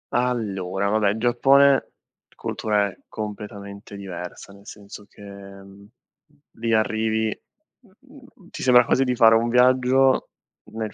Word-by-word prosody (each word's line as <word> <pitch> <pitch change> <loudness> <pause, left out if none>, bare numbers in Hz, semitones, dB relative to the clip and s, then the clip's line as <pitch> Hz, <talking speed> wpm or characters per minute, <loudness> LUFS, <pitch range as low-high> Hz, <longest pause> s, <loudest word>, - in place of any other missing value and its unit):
Allora, 100 -6 -2
va 110 +1 +1
beh, 105 +1 +1
Giappone 135 +4 +3 0.4
cultura 105 -1 -1
è - - -15
completamente 100 -1 -8
diversa, 95 0 -9
nel 100 0 -18
senso 105 0 -12
che, - - -19
mhmm 100 -1 -12
mhmm, 100 +1 -17 0.7
li 115 0 -3
arrivi, 110 0 0 0.4
mhmm, 255 -3 -20
ti - - -8
sembra 125 -2 +5
quasi 135 - +2
di 125 0 -1
fare 115 -1 +6
un 115 +1 +1
viaggio 130 +2 +3 0.4
nel 110 -1 -5
110 Hz, 130 wpm, -22 LUFS, 100-125 Hz, 0.7 s, fare